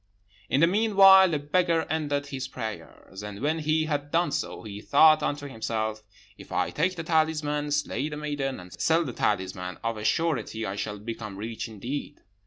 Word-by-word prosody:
"In 140 - +2
the - - +8
meanwhile 195 -1 +6
the 155 - 0
beggar 165 +3 +1
ended 145 -3 -1
his 135 -2 -5
prayers; 110 -5 -8
and 105 -1 -7
when 155 +5 0
he 155 +1 +1
had 145 -2 -2
done 170 0 +1
so, - - -3
he 105 -1 -8
thought 155 +5 +6
unto 145 -1 -2
himself, 110 -3 -3 0.4
'If - - -13
I - - 0
take 185 +5 0
the 165 - -5
talisman, 155 -2 0
slay 145 0 -1
the 150 - -6
maiden, 145 -3 -3
and 90 0 -12
sell 165 +1 +3
the 130 - -5
talisman, 95 -3 -2
of 115 -1 -2
a 105 - -6
surety 115 -4 0
I 95 - -3
shall 105 0 -4
become 105 -1 -7
rich 110 +3 -5
indeed.' 120 +7 -6
145 Hz, 185 wpm, -27 LUFS, 110-160 Hz, 0.4 s, the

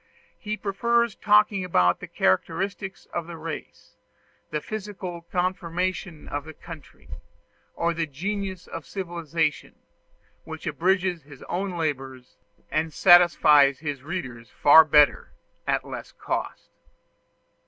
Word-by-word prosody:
He 215 0 -4
prefers 235 +3 +1
talking 210 -2 +3
about 90 - +2
the - - -8
characteristics 190 - -1
of 170 -1 -3
race, 165 -2 -8 0.5
the 150 - -2
physical 190 -3 -6
conformation 180 -2 -2
of 145 0 -4
the 155 -1 -10
country, 160 -5 -12 0.7
or 170 0 0
the 165 -1 -2
genius 190 +5 -4
of 165 - -8
civilization, 170 -4 -3 0.7
which 160 +1 -9
abridges 180 +2 0
his 140 -2 -14
own 185 +1 -3
labors, 135 -5 -4 0.3
and 155 +1 0
satisfies 150 -6 +6
his 145 -3 -5
reader 130 -7 -5
far 150 +6 +7
better 150 -1 +4 0.3
at - - 0
less - - -8
cost. - - -5
170 Hz, 110 wpm, -25 LUFS, 150-190 Hz, 0.7 s, far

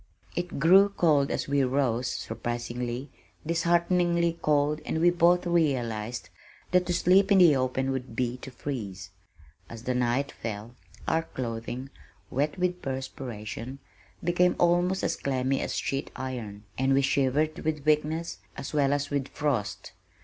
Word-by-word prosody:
It 175 0 -3
grew 190 +7 +6
cold 155 -8 +3
as - - -2
we 140 -1 +2
rose, 125 -2 +1
surprisingly, 120 +3 -4 0.3
dishearteningly 170 0 +2
cold 150 0 +2
and 160 - -2
we 175 +2 +5
both 175 +1 +3
realized 120 - 0 0.4
that 180 0 +3
to 175 - +1
sleep 190 +4 +4
in 200 - +7
the 170 -6 +7
open 130 +1 0
would 130 -3 -4
be 125 0 -1
to 130 - -9
freeze. 100 -9 -6 0.6
As 115 -1 -9
the 125 - -1
night 125 +3 0
fell, 110 +1 -6 0.3
our 160 - +2
clothing, 125 -1 -5 0.4
wet 145 +5 0
with 180 0 -1
perspiration, 130 -2 -5 0.5
became 175 +1 +3
almost 175 +2 +2
as 165 - +1
clammy 135 -1 0
as - - -3
sheet 135 0 -2
iron, 115 -6 -5 0.2
and 135 +1 +3
we 135 - +3
shivered 140 +3 +1
with 155 -2 -2
weakness 155 +2 +1 0.2
as 135 - -6
well 140 -2 +3
as 145 0 -2
with 140 -2 -1
frost. 135 -10 -2
140 Hz, 145 wpm, -28 LUFS, 125-170 Hz, 0.6 s, in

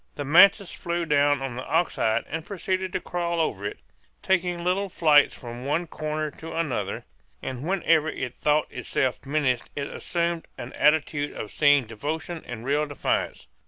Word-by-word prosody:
The 145 - -4
mantis 195 +6 +6
flew 170 0 -3
down 145 -2 +3
on 130 -3 -4
the 130 - -5
ox 165 +3 0
hide 110 +1 +1
and 160 0 -4
proceeded 190 0 -2
to - - 0
crawl 170 -1 -2
over 100 -11 -1
it, - - -6 0.5
taking 180 -2 +1
little 190 +3 0
flights 155 -5 +4
from 120 0 -8
one 155 +6 0
corner 155 -1 -3
to 165 - -7
another; 120 -12 -2 0.4
and 130 -2 -4
whenever 165 -2 +2
it 125 -5 -4
thought 150 +2 +2
itself 130 -2 -1
menaced 140 -4 0
it 140 - -2
assumed 170 -1 -2
an 125 - -7
attitude 150 -1 +2
of 105 - -6
seeming 145 -2 +4
devotion 155 +9 -4
and 120 -1 -7
real 145 +2 +1
defiance. 145 - -2
150 Hz, 165 wpm, -25 LUFS, 135-170 Hz, 0.5 s, mantis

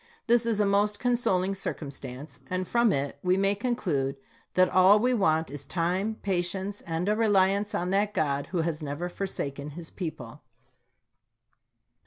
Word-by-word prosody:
This 235 0 +3
is 220 -2 +1
a 210 - +4
most 205 +1 +2
consoling 195 -6 +1
circum 165 -6 -5
stance, 135 +2 -9
and 185 0 -2
from 235 -2 +3
it 140 -3 -2
we 180 +1 +2
may 195 +1 +3
conclude 185 - -1 0.4
that 185 0 +5
all 185 +3 +6
we 250 +4 +2
want 160 - +1
is 145 -1 -7
time, 185 +6 0
patience, 190 +1 -1
and 165 +2 -3
a 210 - +3
reliance 205 -2 +2
on 180 +1 -1
that 200 +1 +2
God 140 -2 0
who 175 -2 -1
has 160 -1 -2
never 150 +4 -4
forsaken 145 -7 -4
this 170 -2 -8
people. 150 - -6
185 Hz, 160 wpm, -28 LUFS, 155-205 Hz, 0.4 s, all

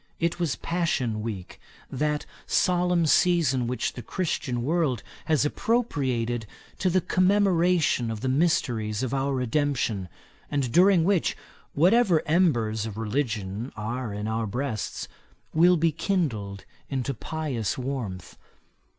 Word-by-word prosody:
It 170 +1 0
was 165 -6 0
Passion 135 -10 -1
Week, 105 -5 -6 0.3
that 150 +2 -1 0.2
solemn 180 -1 +2
season 155 -7 +3
which 125 -1 -2
the 125 - -7
Christian 130 -8 -2
world 150 -3 0 0.2
has 155 -2 +2
appropriated 130 - 0 0.3
to 185 - +2
the 185 +1 +2
commemoration 180 - +2
of 110 -1 -4
the 130 - -2
mysteries 125 -7 +1
of 130 - -2
our 135 0 0
redemption, 125 - 0 0.4
and 140 -4 -1
during 180 +1 +5
which, 185 -1 +1 0.4
whatever 180 +1 +4
embers 120 - +2
of 105 -1 -7
religion 110 -1 -2
are 115 +2 -4
in 105 +1 -4
our 110 0 -1
breasts, 120 0 -3 0.5
will 175 +3 +5
be 165 +1 +2
kindled 125 - -2 0.2
into 135 0 -2
pious 135 -5 -3
warmth. 120 - -5
135 Hz, 125 wpm, -26 LUFS, 115-170 Hz, 0.5 s, during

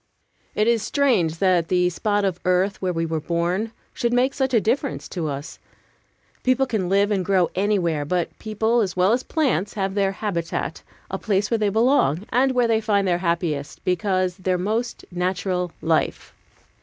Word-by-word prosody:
IT 215 - +2
is 235 -2 +3
strange 215 - +1
that 180 -2 +2
the 180 0 +2
spot 205 +3 0
of 180 -2 -1
earth 185 +2 +1
where 185 -1 0
we 165 -1 -1
were 160 -1 -2
born 175 +7 -1 0.2
should 235 - -1
make 255 +2 +2
such 265 -1 0
a 235 - +4
difference 250 +6 -1
to 170 -4 -3
us. 140 +1 -6 0.8
People 255 +1 +2
can 215 -8 -2
live 200 +2 +3
and 195 -3 +1
grow 185 -2 +2
anywhere, 180 -6 +1
but 175 +4 -2
people 220 +2 +1
as 190 -5 -2
well 185 +3 +4
as 245 - +1
plants 250 - -1
have 195 -2 -1
their 195 -1 +1
habitat, 180 -5 -3 0.3
the - - -3
place 205 0 0
where 230 - +2
they 210 -1 +2
belong, 210 - +2
and 260 +2 +2
where 245 -2 +3
they 225 -1 +2
find 200 -3 +1
their 175 -1 +1
happiest, 170 -5 -2
because 185 0 0
their 185 -1 0
most 220 +6 -2
natural 180 0 -1
life. 160 -1 0
195 Hz, 180 wpm, -23 LUFS, 175-220 Hz, 0.8 s, a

